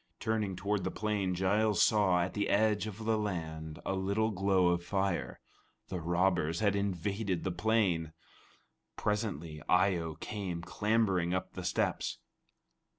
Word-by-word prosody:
Turning 110 -4 -1
toward 100 +1 -1
the 95 - 0
plain, 100 -3 -1
Giles 100 +2 +2
saw, 95 -5 +4
at 90 - -4
the 100 -1 -1
edge 105 0 +2
of 110 +1 -7
the 110 -1 +2
land, 80 -6 -4
a - - 0
little 100 +4 0
glow 95 -2 +3
of 85 0 0
fire. 95 0 -1 0.5
The 90 -2 -3
robbers 85 -1 +1
had 100 -2 +2
invaded 100 -1 -1
the 95 - -1
plain! 90 -4 +1 0.8
Presently 90 -8 -2
Eye 90 +1 +4
o 80 -2 -4
came 95 -5 -5
clambering 95 -2 +1
up 95 - -3
the - - -6
steps. - - -1
95 Hz, 145 wpm, -32 LUFS, 90-105 Hz, 0.8 s, saw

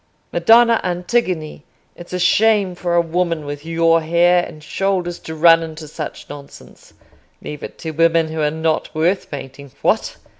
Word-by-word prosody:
Madonna 230 +6 +5
Antigone, 180 -4 -2 0.3
it's 175 - -12
a 180 - -2
shame 200 +1 +3
for 175 -1 -2
a 170 - +5
woman 170 -2 -2
with 145 0 -6
your 165 0 +2
hair 175 +2 +3
and 155 -3 -10
shoulders 180 0 -2
to 160 - -8
run 165 +1 +6
into 160 -1 -8
such 155 0 -7
nonsense—leave 145 +1 -13
it - - -9
to 160 - -6
women 165 0 +2
who 160 0 -4
are 150 - +2
not 160 0 -2
worth 175 +5 0
painting. 140 -1 -9
What! - - 0
165 Hz, 155 wpm, -19 LUFS, 155-180 Hz, 0.3 s, run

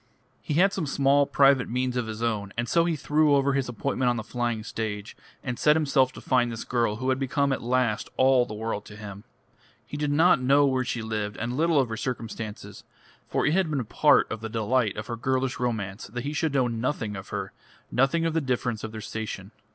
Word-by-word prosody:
He 150 - -3
had 195 +4 +4
some 170 -6 -2
small 140 +1 +3
private 135 -2 +4
means 125 +1 -1
of 125 -2 -1
his 110 +1 -5
own, 105 -4 -1
and 120 +1 -1
so 170 +7 +3
he 170 -2 0
threw 150 0 +3
over 140 0 +2
his 135 -2 -1
appointment 125 +2 -1
on 120 - +1
the 110 - -3
flying 120 -2 -2
stage, 110 -1 -5 0.3
and 125 -2 -4
set 150 0 +5
himself 140 -4 +2
to - - -10
find 125 -2 +2
this 115 - -5
girl 115 -4 0
who 130 +4 -2
had 130 0 +1
become 140 +1 +1
at - - -3
last 120 -2 0
all 130 -1 +5
the 105 - -6
world 110 -1 -3
to 105 - -11
him. 100 -1 -9 0.6
He 145 - -7
did 150 -1 -1
not 160 -1 +4
know 140 +3 +4
where 130 -2 +1
she 120 -2 -3
lived, 105 -2 -3
and 120 +2 -3
little 160 +1 +3
of 130 -3 +1
her 110 - -4
circumstances; 115 -4 -6 0.4
for - - 0
it 145 - +2
had 185 -2 +2
been 140 -6 -1
part - - +4
of 110 - -4
the 110 - -5
delight 110 0 0
of 110 - -4
her 115 - -4
girlish 130 +2 -1
romance 110 -5 -3
that 120 +4 -5
he 145 +2 -3
should 150 -1 -1
know 130 -2 +3
nothing 115 -2 -2
of 95 0 -8
her, - - -4 0.4
nothing 135 +6 +2
of 165 - 0
the 165 - +1
difference 125 -4 -2
of 110 - -5
their 110 0 -7
station. 105 -2 -6
125 Hz, 230 wpm, -26 LUFS, 110-140 Hz, 0.6 s, set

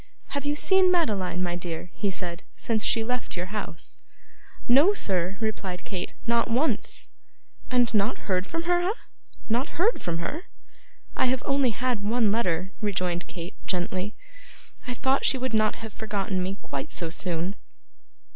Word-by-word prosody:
'Have 285 0 -2
you 290 - +2
seen 380 +4 +5
Madeline, 200 - +1
my 175 -1 0
dear,' 175 -1 -5
he 205 - 0
said, 180 -1 -4
'since 220 -2 0
she 225 - +3
left 250 -4 -2
your 180 +3 -4
house?' 205 -6 -4 0.7
'No, 290 +12 +6
sir!' 185 - 0
replied 205 -5 -3
Kate. 185 -3 -4
'Not 235 0 +2
once.' 255 +8 0 0.6
'And 245 -2 +3
not 210 +2 +1
heard 185 -1 +1
from 330 +7 -2
her, 350 +1 +3
eh? 370 +4 +2 0.5
Not 240 +6 0
heard 415 +8 +3
from 170 -1 -1
her?' 300 - -4 0.7
'I - - +3
have 255 0 +1
only 275 -2 +3
had 240 0 0
one 220 +1 +3
letter,' 190 -4 +1
rejoined 180 -4 0
Kate, 175 +1 -6
gently. 185 +2 -1 0.7
'I 250 - -2
thought 265 +2 +2
she 270 - +4
would 255 -1 -2
not 215 -1 +3
have 225 -2 -8
forgotten 200 -3 -1
me 190 +2 -2
quite 140 -1 -4
so 165 -2 -3
soon. 175 +2 -1
215 Hz, 160 wpm, -27 LUFS, 180-250 Hz, 0.7 s, No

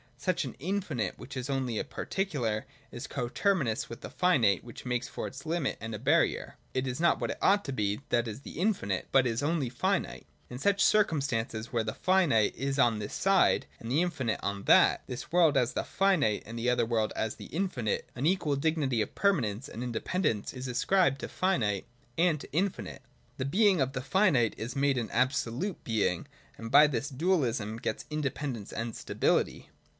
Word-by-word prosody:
Such 175 -4 -1
an 130 - -7
infinite, 155 - -2
which 140 - -9
is 130 +1 -4
only 130 -4 -1
a - - -1
par - - -7
ticular, 125 - -1 0.3
is - - -7
co 120 - -3
terminous 135 - 0
with 115 - -8
the - - -7
finite 130 - +2
which 120 +1 -11
makes 125 -1 -1
for - - -5
it 130 - -9
a - - -12
limit 165 -4 -1
and 115 0 -6
a - - -6
barrier: - - +1 0.2
it 130 0 0
is 130 +1 -3
not 170 0 +3
what - - -1
it - - -7
ought 205 +1 +3
to 135 - -3
be, 105 -1 -1
that 120 0 +1
is, 110 +4 -6
the 150 - -9
infinite, 180 - 0
but 135 -1 +5
is 115 +1 0
only 145 -3 0
finite. 120 0 -1 0.2
In 125 - -6
such 200 +6 +2
circum 200 -8 +3
stances, 115 -3 -3
where 115 -1 +1
the 110 0 -3
finite 175 - +3
is 135 +1 -2
on 120 -5 +4
this 105 -1 -5
side, 195 0 +3
and 115 - -6
the 150 +5 +3
infinite 130 -10 -2
on 100 -1 -2
that, - - +5
— - - -36
this 125 - -7
world 165 -5 +4
as 125 -1 +2
the - - -1
finite 170 - +1
and 115 +2 -7
the 120 +2 0
other 125 -1 +2
world 110 -2 0
as 110 0 -2
the - - -10
infinite, 155 - -2
— - - -36
an 130 +5 0
equal 170 -5 +1
dignity 140 -5 0
of - - -4
permanence 130 - +1
and 115 - -6
inde 120 -2 -3
pendence 150 - -1
is 130 0 -6
ascribed 135 +4 +2
to - - -4
finite 110 - 0 0.3
and 165 -2 +2
to - - -11
infinite. 185 +5 -2 0.4
The 130 - -2
being 190 +2 +3
of 135 0 0
the 125 - -3
finite 135 - +3
is 120 +2 -5
made 140 -1 +2
an 115 - -4
absolute 130 - -1
being, 110 -3 0 0.3
and 115 0 -7
by 150 - +8
this 145 0 -2
dualism 130 - 0
gets 110 - -3
independence 140 -6 -3
and 115 0 -4
stability. - - 0
130 Hz, 205 wpm, -30 LUFS, 115-165 Hz, 0.4 s, by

